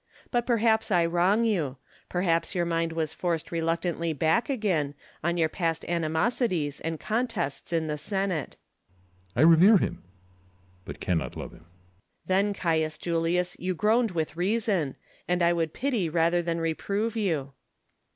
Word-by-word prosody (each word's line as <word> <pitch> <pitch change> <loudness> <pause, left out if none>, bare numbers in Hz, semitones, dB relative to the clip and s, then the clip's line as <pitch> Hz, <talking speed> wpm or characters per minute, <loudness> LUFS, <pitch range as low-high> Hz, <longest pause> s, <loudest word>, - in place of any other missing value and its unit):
But 240 -1 0
perhaps 225 -2 +2
I 175 -4 +3
wrong 180 +7 +2
you; 160 - 0 0.3
perhaps 175 0 0
your 175 -1 +1
mind 165 -1 0
was 160 -1 -2
forced 170 -2 -2
reluctantly 165 0 -1
back 160 - +1
again, 180 - 0 0.3
on 170 +2 0
your 160 -2 +3
past 165 -1 -2
animosities 170 - 0
and 160 -1 -3
contests 215 - -2
in 165 -1 +1
the 150 -1 -3
Senate. 190 -4 -2
CcBsar. 90 0 -36
I 120 - +2
revere 170 +7 +7
him, - - -2 0.8
but - - -8
cannot 85 -4 -1
love - - -6
him. - - -17
Lttcullus. 90 +2 -34
Then, 195 +2 +2
Caius 160 -3 0
Julius, 170 +2 0
you 185 +1 -2
groaned 225 +5 +3
with 160 -4 -3
reason; 190 - 0 0.3
and 180 0 +1
I 170 0 +4
would 165 -2 -1
pity 235 - -1
rather 170 +2 +2
than 170 0 -2
reprove 200 +7 -1
you. 160 -11 -1
170 Hz, 150 wpm, -27 LUFS, 160-195 Hz, 0.8 s, revere